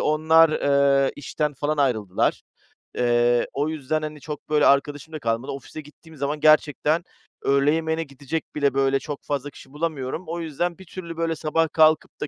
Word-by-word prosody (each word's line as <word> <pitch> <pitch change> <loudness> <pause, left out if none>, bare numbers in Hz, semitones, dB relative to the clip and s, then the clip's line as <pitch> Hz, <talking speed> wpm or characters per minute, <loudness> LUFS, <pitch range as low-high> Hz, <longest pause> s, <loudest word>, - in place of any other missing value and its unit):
onlar, 160 +1 +4
eee, 140 -2 +2
işten 150 +1 -3
falan 150 +3 -2
ayrıldılar. 110 -9 0 0.6
Eee, 120 0 +2
o 145 +2 -1
yüzden, 155 0 -2
hani, 155 -1 -6
çok, 150 -1 -8
böyle, 150 -1 +3
arkadaşım 145 +2 +1
da 155 - -4
kalmadı. 115 +1 -2
Ofise 140 +3 -8
gittiğim 155 +2 -17
zaman 145 +2 -2
gerçekten 155 +1 +3 0.4
öğle 140 +1 +3
yemeğine 160 0 -1
gidecek 140 +3 -6
bile, 140 -3 +1
böyle, 135 0 +2
çok 145 0 -7
fazla 145 0 -3
kişi 135 0 -16
bulamıyorum. 155 0 -3
O 170 +1 -4
yüzden 170 +2 -3
bir 190 - -13
türlü, 170 -1 -8
böyle, 165 -1 -1
sabah 160 +1 0
kalkıp 155 0 +3
da 150 - -2
150 Hz, 170 wpm, -23 LUFS, 140-160 Hz, 0.6 s, onlar